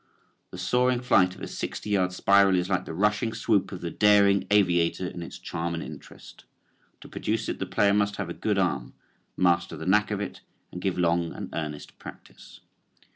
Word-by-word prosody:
The - - -10
soaring 125 0 +1
flight 95 -7 +3
of - - -15
a - - -4
sixty 105 - -5
yard 95 -2 +2
spiral 100 +1 +4
is 90 +1 -1
like 90 -1 0
the - - -6
rushing 105 +4 +1
swoop 105 -5 +1
of 95 - -7
the 85 - -4
daring 100 -1 +4
aviator 90 -3 +2
in 90 -1 -6
its 85 - -8
charm 85 +1 -4
and 80 - -4
interest. - - -12 0.6
To - - -11
produce 110 +1 -3
it - - -4
the 95 - -3
player 100 +2 +2
must 100 0 +1
have 100 - -4
a 85 - -5
good 105 +2 -1
arm, 95 -2 -1 0.4
master 85 -1 +1
the - - -7
knack 105 +3 +3
of 105 -2 -2
it 105 - -6 0.3
and 90 - -7
give 95 -1 -1
long 85 -1 +1
and - - -7
earnest 75 -2 -6
practice. - - -13
95 Hz, 195 wpm, -26 LUFS, 90-105 Hz, 0.6 s, spiral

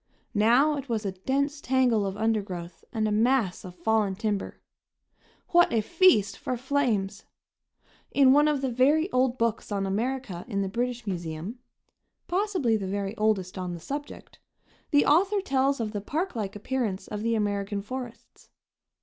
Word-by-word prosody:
Now 245 +8 +4
it 275 -1 -7
was 220 -2 -1
a 195 - -1
dense 280 +9 -1
tangle 250 -6 +2
of 195 +1 -5
undergrowth 195 -6 -2
and 220 -1 0
a - - -1
mass 225 -3 +2
of 180 -1 -9
fallen 215 -2 +1
timber. 210 -1 -3 0.9
What 345 0 +5
a 225 - +2
feast 215 - +3
for 255 - -3
flames! 235 -7 -1 0.8
In 270 -2 +5
one 295 +1 +5
of 295 -3 +1
the 265 -2 -1
very 290 +8 +3
old 255 0 +2
books 230 -2 -1
on 200 -1 -1
America 215 -2 -2
in 200 -4 -1
the - - -2
British 240 +2 -2
Museum 175 +3 -5 0.7
possibly 360 - +1
the 195 -2 -4
very 200 +1 -3
oldest 205 -4 0
on 180 -1 -4
the - - -8
subject 285 - -7 0.5
the 290 -1 +4
author 390 +7 +3
tells 275 -6 +1
of 220 -2 -2
the 205 -2 -4
park 325 - -3
like 205 -3 -3
appearance 210 -4 -2
of 210 0 -5
the 230 +1 +1
American 205 -1 -1
forests. 250 +1 -8
225 Hz, 160 wpm, -27 LUFS, 200-270 Hz, 0.9 s, What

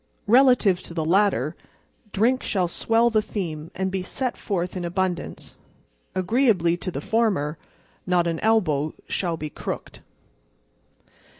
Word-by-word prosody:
Relative 240 -5 +5
to 170 - -9
the 160 -2 -1
latter, 170 - +2 0.6
drink 240 +6 +2
shall 185 -5 0
swell 230 +6 +2
the 215 -1 +3
theme 165 -7 -5
and 190 0 -1
be 190 0 -2
set 250 +7 -2
forth 180 -3 -3
in 180 - -3
abundance. 180 +1 -3 0.6
Agreeably 185 -3 +2
to 180 +1 -5
the 145 -5 -4
former, 185 -9 0 0.5
not 180 -1 +3
an 165 -1 -1
elbow 160 -10 +1
shall 170 -3 -1
be 155 -1 -5
crooked. - - -6
185 Hz, 130 wpm, -24 LUFS, 170-220 Hz, 0.6 s, Relative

